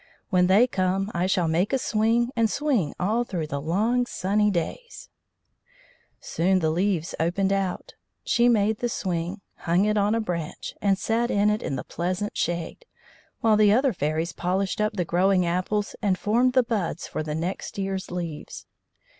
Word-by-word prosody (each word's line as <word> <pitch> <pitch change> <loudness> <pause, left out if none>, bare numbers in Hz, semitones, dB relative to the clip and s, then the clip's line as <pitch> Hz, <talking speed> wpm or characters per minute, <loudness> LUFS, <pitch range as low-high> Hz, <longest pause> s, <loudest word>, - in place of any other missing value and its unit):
"When 180 -1 +4
they 200 +6 +6
come 195 -2 -1
I 175 +2 0
shall 185 -3 +1
make 170 +5 +1
a 270 - +2
swing, 230 +1 +1
and 230 -2 +2
swing 265 - 0
all 220 +6 +1
through 175 -9 -3
the 140 -2 -4
long 220 - +1
sunny 210 +1 +1
days." 200 - -4 1.1
Soon 185 +3 +1
the 160 -3 +1
leaves 175 -1 0
opened 190 +4 +1
out. 195 - -2 0.3
She 240 +1 +3
made 215 -2 +2
the 240 - -1
swing, 180 -1 -3 0.2
hung 175 +4 +1
it 210 0 +1
on 205 +2 +2
a - - +1
branch, 170 -7 -4
and 195 -1 +2
sat 230 +4 0
in 205 +1 +3
it 210 - -1
in 135 - -3
the - - -4
pleasant 185 +5 -3
shade, 175 - -3 0.5
while 220 -2 +4
the 210 -1 +5
other 255 +3 +3
fairies 155 +1 -2
polished 190 +3 -1
up 215 +1 +1
the 180 -4 -1
growing 180 +2 +2
apples 185 +4 -1
and 195 -4 +1
formed 240 +6 +2
the 255 - +4
buds 205 -8 -2
for - - -4
the 150 -1 -4
next 175 +6 -4
year's 195 -1 -3
leaves. 170 -4 -6
195 Hz, 175 wpm, -25 LUFS, 175-215 Hz, 1.1 s, they